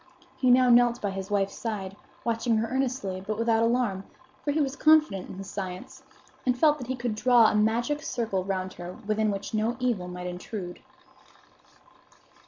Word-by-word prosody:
He 255 - +1
now 250 0 +6
knelt 240 0 +5
by 205 - -2
his 190 0 -6
wife's 195 -1 0
side, 200 -4 -5 0.3
watching 230 0 +1
her 225 +1 0
earnestly, 255 -7 -2
but 210 +1 -3
without 230 0 +2
alarm; 230 -5 +1 0.4
for - - -2
he 295 +2 +1
was 280 -2 0
confident 305 -12 +3
in - - -8
his 195 0 -7
science, 195 +7 -6 0.4
and 250 -1 +1
felt 300 +2 +4
that 250 - -7
he 260 - -2
could 240 -2 -2
draw 235 0 +5
a - - -1
magic 235 +7 +1
circle 225 -10 -2
round 185 -1 -3
her 175 +1 -8
within 215 +1 +1
which 200 +1 -4
no 220 +2 0
evil 235 -8 -1
might 180 0 -7
intrude. 180 +1 -6
225 Hz, 180 wpm, -27 LUFS, 195-250 Hz, 0.4 s, now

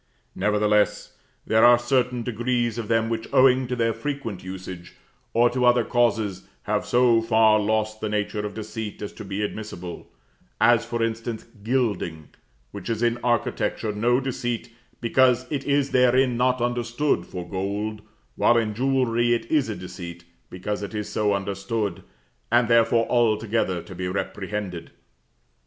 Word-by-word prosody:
Nevertheless, 105 +1 +1 0.3
there 110 0 +3
are 120 0 +8
certain 125 0 0
degrees 120 0 -1
of 110 - -4
them, 115 0 +2
which, 115 -1 -3
owing 130 -1 +5
to 125 - -2
their 115 -1 +1
frequent 115 -5 -5
usage, 95 -1 -8 0.4
or 120 +1 +4
to 125 0 -1
other 120 -1 +5
causes, 110 -5 0 0.2
have - - -1
so 120 -2 +4
far 110 -1 +4
lost 110 +1 -1
the 110 - -2
nature 105 0 -2
of 105 -1 -5
deceit 110 -1 -6
as 105 - -6
to - - -9
be 100 +1 -3
admissible; 95 -5 -6 0.5
as, 115 +1 +5
for 120 0 -2
instance, 115 0 -3 0.2
gilding, 105 - -1 0.4
which 100 +2 -7
is 115 0 -1
in 120 0 +1
architecture 120 -2 0
no 120 +4 +2
deceit, 120 -3 -3 0.3
because 125 +1 +3
it 140 -2 -2
is 140 -1 +1
therein 125 0 +4
not 125 +1 +1
understood 120 -3 0
for 90 -1 -7
gold; 100 +3 -3 0.3
while 120 - +4
in 110 -2 0
jewellery 120 -1 +2
it 115 - -4
is 150 -7 +2
a 110 - -3
deceit, 85 -2 -8 0.3
because 105 +3 -4
it 100 +2 -6
is 105 -1 -3
so 105 -1 +1
understood, 100 0 -3 0.5
and 120 0 +4
therefore 115 0 +4
altogether 110 -6 +1
to 95 - -11
be 90 0 -4
reprehended. 95 -1 -4
115 Hz, 150 wpm, -24 LUFS, 105-120 Hz, 0.5 s, are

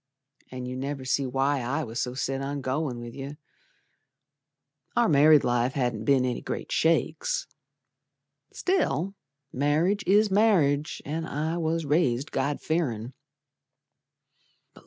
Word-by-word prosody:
An' 125 -1 -6
you 125 0 -5
never 135 0 -4
see 135 +1 0
why 135 +2 +1
I 140 +6 -1
was 115 -1 -5
so 125 0 -3
set 135 0 -2
on 140 +1 -3
goin' 130 -1 -2
with 120 0 -8
yer, 140 +2 -7 1.6
Our 240 - +4
married 150 0 +6
life 120 +1 +1
hadn't 120 -6 -1
be'n 135 -1 +3
any 125 -1 -2
great - - -5
shakes, - - +1 1.1
Still 195 - 0 0.4
marriage 155 +9 +1
is 205 +2 +4
marriage, 165 -9 +2
an' 160 +3 -3
I 160 +4 -2
was 165 0 -1
raised 145 -3 +1
God 140 +2 -1
fearin'. 130 -8 -2
140 Hz, 125 wpm, -27 LUFS, 130-160 Hz, 1.6 s, married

